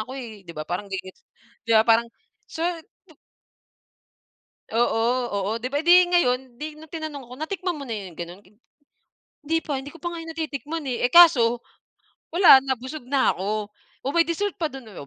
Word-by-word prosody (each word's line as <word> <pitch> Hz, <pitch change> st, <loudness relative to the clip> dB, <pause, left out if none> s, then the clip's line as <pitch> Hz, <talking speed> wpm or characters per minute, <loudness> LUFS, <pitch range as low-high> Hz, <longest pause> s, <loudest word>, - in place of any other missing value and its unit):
ako, 255 Hz, -, -9 dB
eh, 220 Hz, -5 st, -9 dB
'di 170 Hz, -, -9 dB
ba? 155 Hz, -, -4 dB
Parang 180 Hz, +4 st, -3 dB
di 190 Hz, -, -1 dB
ge 185 Hz, -, -12 dB
gets, -, -, -32 dB, 0.4 s
'di 230 Hz, -, +1 dB
ba, -, -, +6 dB
parang 230 Hz, +1 st, +5 dB, 0.4 s
so 320 Hz, -, -9 dB, 0.5 s
pu 320 Hz, -, -18 dB, 1.6 s
Oo, 235 Hz, -1 st, +2 dB, 0.5 s
oo, -, -, -1 dB
di 255 Hz, -, -3 dB
ba? 285 Hz, -, 0 dB
Eh, 320 Hz, -, -5 dB
di 360 Hz, +1 st, +8 dB
ngayon 255 Hz, -7 st, +1 dB
di 305 Hz, 0 st, -6 dB
nung 310 Hz, 0 st, -15 dB
tinanong 310 Hz, -4 st, -6 dB
ako, 245 Hz, 0 st, -12 dB
"Natikman 350 Hz, +1 st, -3 dB
mo 280 Hz, -, -8 dB
na 230 Hz, -, -3 dB
'yon 195 Hz, -4 st, -7 dB
gano'n?" 175 Hz, +3 st, -8 dB, 1.0 s
"Hindi 325 Hz, +2 st, +2 dB
pa, 285 Hz, -4 st, -3 dB
hindi 285 Hz, +4 st, -9 dB
ko 335 Hz, -, -15 dB
pa 345 Hz, -, -2 dB
nga 340 Hz, -, -6 dB
'yon 330 Hz, 0 st, -7 dB
natitikman, 315 Hz, 0 st, -4 dB
eh." 245 Hz, 0 st, +1 dB
Eh, 245 Hz, -, -8 dB
kaso 245 Hz, -9 st, +7 dB, 0.7 s
wala 345 Hz, -6 st, +9 dB
na 265 Hz, -, +1 dB
busog 260 Hz, +2 st, -9 dB
na 270 Hz, +1 st, +2 dB
ako. 210 Hz, +2 st, -3 dB, 0.3 s
"Oh, 270 Hz, -, -2 dB
may 335 Hz, +2 st, +3 dB
dessert 370 Hz, +4 st, -2 dB
pa 330 Hz, -, 0 dB
do'n, 265 Hz, -6 st, -9 dB
oh." 140 Hz, -, -9 dB
270 Hz, 205 wpm, -24 LUFS, 230-320 Hz, 1.6 s, wala